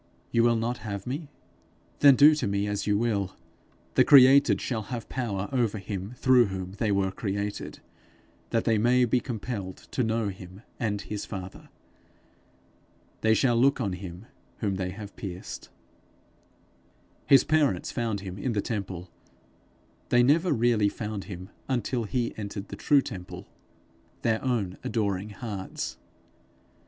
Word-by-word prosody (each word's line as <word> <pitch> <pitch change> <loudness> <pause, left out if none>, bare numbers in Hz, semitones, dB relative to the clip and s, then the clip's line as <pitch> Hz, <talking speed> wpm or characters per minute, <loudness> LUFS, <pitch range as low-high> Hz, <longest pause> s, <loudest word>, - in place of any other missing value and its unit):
You 115 - +3
will 120 0 +4
not 115 +2 -1
have 100 -3 -5
me? 140 +4 -4 0.7
Then 140 -2 +8
do 145 +4 +8
to 150 - -1
me 100 0 0
as 105 0 -2
you 105 -1 +3
will. 100 -4 -1 0.6
The - - +5
created 135 0 +7
shall 115 -4 -2
have 120 -3 -5
power 105 -6 -2
over 120 -5 +1
him 100 +3 -6
through 130 -2 +5
whom 95 -1 -5
they 105 +2 -1
were 100 -1 +1
created, 100 +1 -4 0.7
that 115 - +1
they 115 -2 +2
may 125 +3 +4
be 125 +2 +2
compelled 110 -6 -5
to 125 - 0
know 110 -1 0
him 95 +2 -10 0.2
and 105 -4 -1
his 105 0 -5
father. 95 -2 -8 1.5
They 110 0 +4
shall 120 -1 +3
look 135 +4 +3
on 100 -7 -1
him 90 +2 -8 0.3
whom 100 -4 -1
they 90 -1 -2
have 100 +2 -9
pierced.' 95 -2 -7 1.6
His 135 -2 +7
parents 155 -2 +1
found 115 -5 -2
him 95 0 -7
in 120 +4 -1
the 105 - 0
temple; 95 -5 -5 1.0
they 120 0 +5
never 160 +7 +3
really 115 -5 +3
found 105 -2 -5
him 95 0 -8 0.2
until 125 -2 -1
he 120 +2 -1
entered 100 -1 -6
the - - -6
true 140 -2 +3
temple 90 -6 -8 0.8
their 110 -1 +1
own 110 -8 -1
adoring 105 -2 -1
hearts. 100 -2 -5
110 Hz, 145 wpm, -27 LUFS, 100-120 Hz, 1.6 s, Then